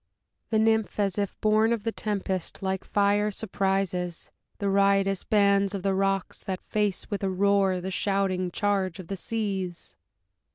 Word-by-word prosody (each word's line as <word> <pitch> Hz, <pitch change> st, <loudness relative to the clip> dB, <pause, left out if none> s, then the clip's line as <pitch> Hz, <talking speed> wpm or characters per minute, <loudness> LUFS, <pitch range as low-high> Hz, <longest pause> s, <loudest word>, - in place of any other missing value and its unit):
The 220 Hz, -, +2 dB
Nymph, 220 Hz, -1 st, +2 dB
as 200 Hz, -1 st, +1 dB
if 200 Hz, -1 st, -3 dB
born 215 Hz, +1 st, +3 dB
of 230 Hz, -3 st, -1 dB
the 225 Hz, -, -1 dB
tempest, 195 Hz, -4 st, -3 dB
like 190 Hz, 0 st, -1 dB
fire 205 Hz, +1 st, +2 dB
surprises 190 Hz, -4 st, -2 dB, 0.3 s
The 200 Hz, -, -2 dB
riotous 195 Hz, 0 st, +2 dB
bands 200 Hz, -1 st, +3 dB
of 190 Hz, -, -5 dB
the 195 Hz, -1 st, +1 dB
rocks, 195 Hz, 0 st, -1 dB
That 190 Hz, -1 st, -4 dB
face, 210 Hz, -2 st, -1 dB
with 205 Hz, -1 st, -2 dB
a 195 Hz, -, +1 dB
roar, 195 Hz, 0 st, +2 dB
the 190 Hz, +2 st, -4 dB
shouting 190 Hz, -2 st, 0 dB
charge 195 Hz, -2 st, 0 dB
of 185 Hz, -, -10 dB
the 195 Hz, -, -2 dB
seas. 195 Hz, -5 st, -3 dB
195 Hz, 160 wpm, -27 LUFS, 190-205 Hz, 0.3 s, born